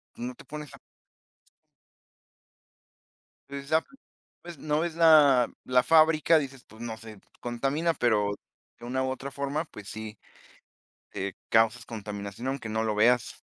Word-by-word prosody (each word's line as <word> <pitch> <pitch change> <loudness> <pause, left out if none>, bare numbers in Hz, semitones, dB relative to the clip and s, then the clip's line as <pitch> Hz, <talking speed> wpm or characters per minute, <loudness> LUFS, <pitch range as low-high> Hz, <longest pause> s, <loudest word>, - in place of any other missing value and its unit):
No 125 +1 -5
te - - -15
pones 150 0 -8
a - - -16 2.7
Exacto, 145 - -2 0.5
ves 170 -3 -9
no 150 0 -1
ves 165 0 -2
la 150 -7 +6 0.2
la 125 -1 +3
fábrica, 160 +2 +5
dices 135 -3 -7
pues 110 +1 -15
no 115 -2 -5
sé, 110 -3 -11 0.2
contamina, 135 +8 0
pero 105 -7 +2 0.5
de 120 - -10
una 130 +2 -1
u 130 - -1
otra 135 +1 -5
forma, 140 +3 -2
pues 105 -9 -11
sí, 110 -1 -7 1.0
eh, 95 0 -3 0.2
causas 115 +1 +3
contaminación, 105 +1 -6
aunque 135 -4 -3
no 110 +1 -1
lo 110 -1 0
veas. 120 +3 +2
125 Hz, 135 wpm, -28 LUFS, 110-150 Hz, 2.7 s, la